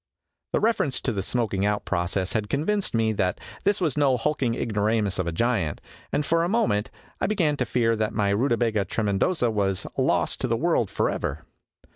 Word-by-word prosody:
The - - +3
reference 210 - +1
to 130 - -1
the 100 -3 -2
smoking 105 -2 -1
out 105 0 0
process 90 +2 -1
had 105 -2 -1
convinced 195 - 0
me 110 -1 +2
that 90 -3 0 0.3
this 205 +1 +2
was 160 -8 0
no 135 -3 +3
hulking 125 -2 0
ignoramus 105 -2 0
of 90 - -1
a - - 0
giant, 95 -4 0 0.3
and 145 +1 0
for 165 +2 +2
a 170 - 0
moment 115 - +1 0.3
I - - +1
began 175 -8 +1
to 125 - -1
fear 115 -1 +2
that 110 0 -1
my 100 -2 +1
Rutabaga 115 -2 +1
Trcmcndosa 115 - 0
was 95 -3 0
lost - - +1
to - - 0
the - - +1
world - - +1
forever. - - -2
115 Hz, 185 wpm, -25 LUFS, 100-140 Hz, 0.3 s, The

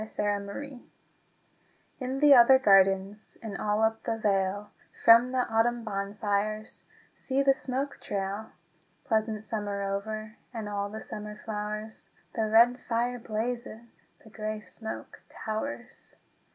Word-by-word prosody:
VI 210 -1 -1
Autumn 200 0 -7
Fires 270 +5 -7 1.2
In 260 0 -3
the 295 -1 +8
other 260 +1 +8
gardens 195 -2 +3
And 215 -3 -5
all 210 +1 0
up 220 0 +1
the 225 - -2
vale, 200 -1 0 0.3
From 235 +2 +8
the 260 -1 +2
autumn 230 +1 +1
bonfires 205 +1 -2 0.3
See 270 +1 -1
the 275 0 +5
smoke 270 +1 -3
trail! 200 +2 -3 0.6
Pleasant 220 -1 0
summer 205 -2 -3
over 215 +2 -4
And 225 -4 -5
all 205 -1 -2
the 220 +1 -7
summer 210 0 -7
flowers, 215 0 -5 0.2
The 220 -1 0
red 235 +3 +5
fire 245 +1 -1
blazes, 235 +1 -5 0.2
The 220 - -16
grey 215 0 -4
smoke 220 +1 -7
towers. 240 +3 -5
220 Hz, 130 wpm, -29 LUFS, 210-235 Hz, 1.2 s, the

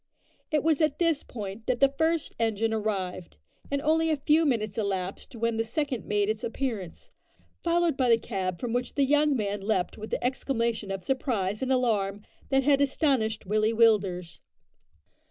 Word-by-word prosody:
It 305 -2 +1
was 320 -1 +2
at 310 -2 +2
this 330 -4 +2
point 210 -1 -7
that 245 -1 +1
the 275 0 +4
first 320 +1 0
engine 225 0 +1
arrived, 195 - -3 0.3
and 280 - 0
only 320 +1 +2
a 310 - +1
few 305 +3 +3
minutes 215 -6 0
elapsed 195 +3 -3
when 230 0 -1
the 225 - +1
second 255 +1 -2
made 205 -1 +1
its 215 +2 -2
appearance, 235 - -4 0.5
followed 340 -3 +1
by 255 -2 +2
the 230 - +6
cab 190 -6 -3
from 240 -2 -3
which 245 0 -2
the 280 - +3
young 295 +1 +3
man 205 -3 -2
leapt 195 -1 -1
with 215 +1 -7
the - - -2
exclamation 235 -4 -1
of 195 -1 -4
surprise 215 -7 -1
and 265 0 -1
alarm 210 -6 +1 0.3
that 270 0 +3
had 280 0 +4
astonished 265 -7 +1
Willie 215 +3 +1
Willders. 200 -7 +2
230 Hz, 175 wpm, -27 LUFS, 205-275 Hz, 0.5 s, the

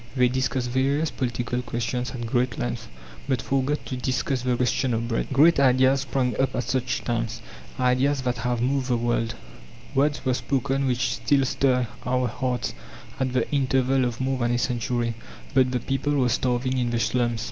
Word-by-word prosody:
They 125 -1 +4
discussed 130 -1 -1
various 140 +4 +1
political 125 -1 -2
questions 125 +1 -2
at 120 -2 -5
great 120 0 0
length, - - -3 0.4
but 130 -2 +2
forgot 135 +5 -1
to 130 - -4
discuss 130 +1 -1
the 125 0 +1
question 125 0 +1
of 115 +1 -2
bread. 115 - -1
Great 150 +4 +5
ideas 130 0 +4
sprang 130 -3 -1
up 135 - 0
at 125 - 0
such 125 0 -1
times, 115 -1 -2 0.4
ideas 130 +2 +2
that 125 -1 -1
have 120 0 -1
moved 135 0 0
the 125 -2 +2
world; 115 -1 0 0.6
words 145 +1 +1
were 130 - +2
spoken 135 +1 0
which 125 -1 +1
still 140 +2 +2
stir 125 -2 +1 0.2
our 125 0 +1
hearts, 125 -1 -2 0.5
at 130 -1 0
the 130 - +1
interval 135 -1 +2
of 120 -2 -2
more 130 0 -1
than 120 0 +1
a - - +2
century. 120 -1 -1 0.4
But 130 -1 +4
the 125 - 0
people 135 +4 -1
were 130 -3 +2
starving 125 +2 0
in 120 -1 0
the 120 -1 0
slums. 120 -1 0
125 Hz, 180 wpm, -25 LUFS, 120-135 Hz, 0.6 s, Great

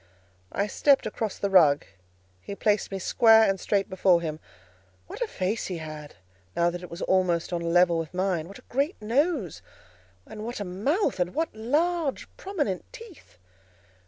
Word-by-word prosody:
I 200 - 0
stepped 275 +6 +3
across 215 -1 -3
the 200 - -2
rug; 155 -7 +5 0.6
he 200 - -7
placed 205 0 0
me 195 - -3
square 225 +3 +5
and 195 -1 0
straight 200 0 0
before 185 -2 +3
him. 155 -2 -5 0.7
What - - -10
a 485 - 0
face 200 - -2
he 180 - -4
had, 155 -2 -8 0.4
now 170 0 +2
that 175 0 -6
it 180 - -9
was 170 - -6
almost 180 -2 +1
on 170 - -1
a - - -4
level 175 0 +4
with 160 -2 -5
mine! 185 -3 -1
what 200 - -11
a - - -17
great 280 +7 -2
nose! 245 - 0 0.6
and 215 0 -9
what 235 +1 -5
a 205 - -3
mouth! 215 - -1
and 180 0 -1
what 320 -6 -1
large 300 +6 0
prominent 300 - -3
teeth! 450 - -14
195 Hz, 175 wpm, -26 LUFS, 175-250 Hz, 0.7 s, rug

